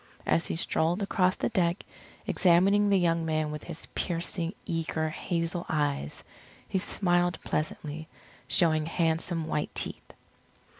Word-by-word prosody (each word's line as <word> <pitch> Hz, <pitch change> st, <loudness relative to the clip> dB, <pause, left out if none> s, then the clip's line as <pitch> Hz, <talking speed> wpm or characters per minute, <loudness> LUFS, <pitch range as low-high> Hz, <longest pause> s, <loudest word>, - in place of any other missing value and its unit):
As 165 Hz, -, +2 dB
he -, -, -2 dB
strolled 165 Hz, +4 st, +1 dB
across 185 Hz, -2 st, +2 dB
the -, -, -1 dB
deck, 180 Hz, -5 st, +1 dB, 0.4 s
examining 195 Hz, +3 st, +4 dB
the 200 Hz, -, +5 dB
young 170 Hz, -2 st, +2 dB
men 155 Hz, -1 st, 0 dB
with 150 Hz, 0 st, -6 dB
his 165 Hz, -2 st, -4 dB
piercing, 170 Hz, +1 st, -1 dB
eager, 160 Hz, -1 st, -1 dB
hazel 170 Hz, +1 st, -2 dB
eyes, 145 Hz, -, -1 dB, 0.4 s
he 190 Hz, -, 0 dB
smiled 175 Hz, -2 st, +1 dB
pleasantly, 155 Hz, 0 st, -3 dB, 0.4 s
showing 155 Hz, +2 st, +3 dB
handsome 165 Hz, 0 st, 0 dB
white 150 Hz, -2 st, -2 dB
teeth. -, -, -4 dB
165 Hz, 130 wpm, -29 LUFS, 160-180 Hz, 0.4 s, the